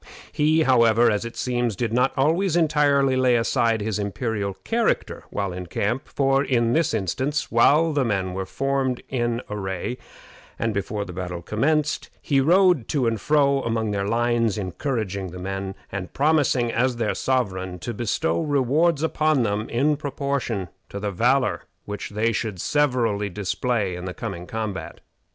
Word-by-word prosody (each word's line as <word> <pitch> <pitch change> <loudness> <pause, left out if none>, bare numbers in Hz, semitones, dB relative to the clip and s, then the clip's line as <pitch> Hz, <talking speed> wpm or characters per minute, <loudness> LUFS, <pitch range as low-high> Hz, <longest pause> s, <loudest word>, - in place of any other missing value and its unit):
He, 155 +2 +3
however, 115 -3 +4
as 105 +2 -1
it 115 - -7
seems, 120 -3 -1
did 115 +3 -2
not 125 +2 +3
always 165 +6 +2
entirely 145 -5 +3
lay 130 -1 +3
aside 115 -1 +1
his 105 0 -2
imperial 100 -1 -2
character 230 0 -1
while 100 -3 -2
in 90 0 -6
camp, 105 +9 -2
for 135 0 +2
in 120 -4 +1
this 165 -2 +2
instance, 130 - -1
while 150 +7 +4
the 145 -2 +2
men 95 -5 -1
were 95 0 -4
formed 135 +1 -1
in 120 -2 -1
array, 100 +3 -4 0.6
and 115 -1 -1
before 100 +1 -2
the 90 - -8
battle 90 -1 -5
commenced, 150 - 0
he 140 -2 +1
rode 175 - +4
to 140 -5 0
and 115 -2 0
fro 140 -2 +3
along 115 -2 -1
their 100 -1 -1
lines, 115 -1 +1
encouraging 100 - -3
the 90 +1 -9
men, 95 +1 -4 0.2
and 95 -2 -5
promising, 140 -5 +2
as 125 +2 +1
their 115 -2 -1
sovereign, 95 -8 -1
to 120 +7 -5
bestow 120 +10 -1
rewards 150 +2 +2
upon 155 -4 +2
them 105 0 -1
in 145 +6 +2
proportion 140 - -2 0.2
to 100 - -6
the 100 0 -2
valor 125 +7 +1 0.2
which 105 -1 -5
they 110 +2 0
should 110 -4 -3
severally 120 - +1
display 100 +1 -1
in 90 +1 -7
the 90 - -5
coming 90 -6 -6
combat. 110 -4 -5
120 Hz, 160 wpm, -24 LUFS, 100-140 Hz, 0.6 s, however